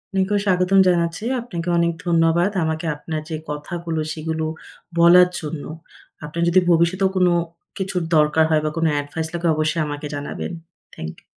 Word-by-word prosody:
আপনাকেও 195 +2 +1
স্বাগতম 185 0 +3
জানাচ্ছি, 170 +2 +1 0.2
আপনাকে 175 -8 -6
অনেক 170 0 +2
ধন্যবাদ। 170 +2 +3
আমাকে 160 +1 -2
আপনার 155 +1 -5
যে 160 - -3
কথাগুলো, 160 +2 -4
সেগুলো 160 0 -3 0.6
বলার 180 +1 +7
জন্য। 150 -1 -6 0.6
আপনার 160 +3 -4
যদি 180 +2 +5
ভবিষ্যতেও 175 +3 +3
কোন 180 -1 +4 0.5
কিছুর 190 -2 -2 0.2
দরকার 150 +1 +4
হয় 155 -1 +3
বা - - +1
কোন 165 - +1 0.2
এডভাইস 150 +3 -4
লাগে 170 0 -1
অবশ্যই 155 +1 0
আমাকে 145 0 -5
জানাবেন। 145 +4 -5 0.4
Thank 80 0 -6
you. - - -31
165 Hz, 155 wpm, -21 LUFS, 155-180 Hz, 0.6 s, বলার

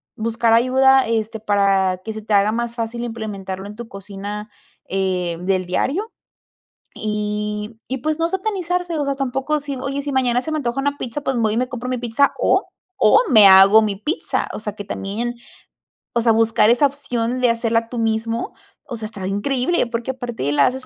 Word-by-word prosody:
Buscar 230 +1 +1
ayuda, 265 +2 +4
este, 225 0 -1
para 195 -3 +2
que 220 - -4
se 220 - -7
te 215 0 -3
haga 200 +1 +4
más 235 +1 -3
fácil 235 0 -4
implementarlo 200 -5 -5
en 210 - -9
tu 235 +1 -8
cocina, 205 +1 -7 0.4
em, 180 -3 -2
del 185 -1 +1
diario 295 - -1 0.8
y 210 +1 -3
y, 265 - -2
pues, 310 +4 -1
no 330 0 +1
satanizarse, 360 -3 -2
o 290 - -1
sea, 280 - 0
tampoco 270 +3 -1
si, 285 -1 -5
oye, 275 +2 -3
si 285 0 -4
mañana 250 -2 +2
se 315 - -5
me 310 - 0
antoja 260 -3 -2
una 285 +1 -1
pizza, 255 +3 -5
pues, 270 -3 -1
voy 220 -2 +1
y - - -1
me 250 +1 0
compro 250 0 -5
mi 255 -1 -1
pizza 240 +4 +2
o - - +2 0.3
o - - +6
me 220 -7 +7
hago 195 +3 +8
mi 210 -2 -1
pizza. 295 - -2
O - - -5
sea, 210 -1 -5
que 205 - -6
también, 225 +6 -4 0.8
o 235 - +1
sea, 230 0 +4
buscar 225 -1 +3
esa 245 +5 +4
opción 255 -3 -2
de 250 - +4
hacerla 230 0 0
tú 245 - -6
mismo, 225 +1 -1 0.4
o 240 - -3
sea, 220 - -6
está 205 -3 -7
increíble. 255 - 0
Porque 235 +2 -3
aparte 240 - -4
la 145 -1 +4
haces 260 +1 -4
230 Hz, 195 wpm, -20 LUFS, 210-260 Hz, 0.8 s, hago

